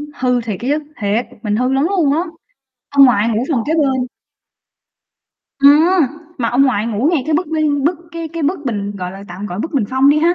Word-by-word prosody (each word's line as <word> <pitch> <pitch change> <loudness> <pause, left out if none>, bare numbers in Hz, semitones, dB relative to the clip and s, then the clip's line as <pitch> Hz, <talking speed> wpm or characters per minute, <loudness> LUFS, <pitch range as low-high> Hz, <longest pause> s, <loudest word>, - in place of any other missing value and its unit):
hư 250 -2 0
thiệt 215 -5 -5
á 245 - -4
chứ. 295 +2 +1 0.2
Thiệt, 210 +4 0 0.2
mình 210 -1 0
hư 255 +4 0
lắm 270 +3 +2
luôn 325 -8 +2
á! 315 - +1 0.7
Ông 280 -1 +6
ngoại 230 -3 +3
ngủ 230 +2 0
phòng 255 -7 +1
kế 310 - 0
bên. 265 -5 +1 1.5
Ừm, 285 +2 +6 0.6
mà 230 - 0
ông 250 +3 +3
ngoại 230 -5 +1
ngủ 230 +5 0
ngay 305 -6 +1
cái 310 - +1
bức, 355 +2 0
ư, 305 -2 0
bức 335 +1 +1
cái 335 -1 -5
cái 330 0 -5
bức 315 +7 0
bình, 205 -3 -3
gọi 180 -1 -5
là, 195 +1 -10
tạm 185 +4 -6
gọi 180 -3 -6
là - - -6
bức 320 - -4
bình 265 -8 +1
phong 265 +2 +3
đi 300 - +3
ha, 340 +3 +3
265 Hz, 230 wpm, -17 LUFS, 220-300 Hz, 1.5 s, Ông